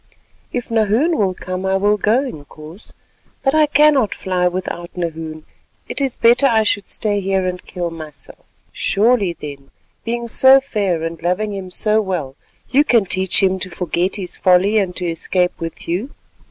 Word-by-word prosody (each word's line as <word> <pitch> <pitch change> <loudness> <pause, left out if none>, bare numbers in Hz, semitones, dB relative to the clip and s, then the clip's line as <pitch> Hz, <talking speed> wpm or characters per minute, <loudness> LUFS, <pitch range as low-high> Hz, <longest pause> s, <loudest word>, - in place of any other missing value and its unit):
"If 245 -2 -4
Nahoon 225 +9 +2
will 190 -6 0
come, 185 +1 -5
I 190 0 +1
will 205 +2 +1
go, 230 +7 +2
Inkoos, 155 - -10 0.5
but 270 - +2
I 310 -1 +4
cannot 290 -7 +3
fly 180 -1 -1
without 175 -1 -4
Nahoon; 160 -2 -5 0.4
it - - -5
is 270 -3 -1
better 240 +4 +4
I 225 -3 +3
should 205 -1 -1
stay 205 -2 0
here 190 -1 -1
and 180 0 -4
kill 175 -1 -5
myself." 155 -4 -11 0.3
"Surely 205 -3 +1
then 140 -4 -10 0.3
being 235 +1 -3
so 265 +3 +7
fair 200 - -2
and 165 0 -5
loving 190 +5 -1
him 190 -2 -6
so 215 +4 +3
well, 170 -10 -4 0.4
you 275 +3 +5
can 235 -8 +3
teach 190 +1 +2
him 190 0 +2
to 185 - -2
forget 180 +1 -2
his 190 -4 -2
folly 190 +4 +3
and 185 -3 -2
to 180 - -4
escape 180 +2 0
with 165 0 -7
you. 185 +10 -2
190 Hz, 170 wpm, -18 LUFS, 175-225 Hz, 0.5 s, so